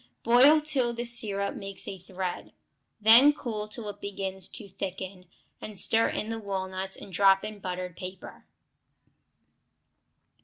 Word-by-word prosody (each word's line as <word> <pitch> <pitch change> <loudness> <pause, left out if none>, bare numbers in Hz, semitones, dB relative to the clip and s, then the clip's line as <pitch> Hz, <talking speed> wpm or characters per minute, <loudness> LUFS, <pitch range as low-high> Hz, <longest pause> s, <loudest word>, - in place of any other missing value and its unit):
Boil 265 +7 +6
till 265 -6 +1
the 240 +1 -4
syrup 205 -4 +1
makes 195 0 -7
a 190 - -6
thread, 185 0 -6 0.5
then 230 +7 +8
cool 225 -7 -5
till 215 +1 -8
it 205 0 -8
begins 190 -1 -4
to 215 -5 -9
thicken, 190 -1 -6 0.3
and 210 -2 -8
stir 225 +4 +3
in 215 - -3
the 225 0 -3
walnuts 190 -2 -4
and 190 - -12
drop 195 +1 +4
on 215 -1 -7
buttered 180 -2 -5
paper. 185 0 -9
200 Hz, 140 wpm, -28 LUFS, 190-225 Hz, 0.5 s, then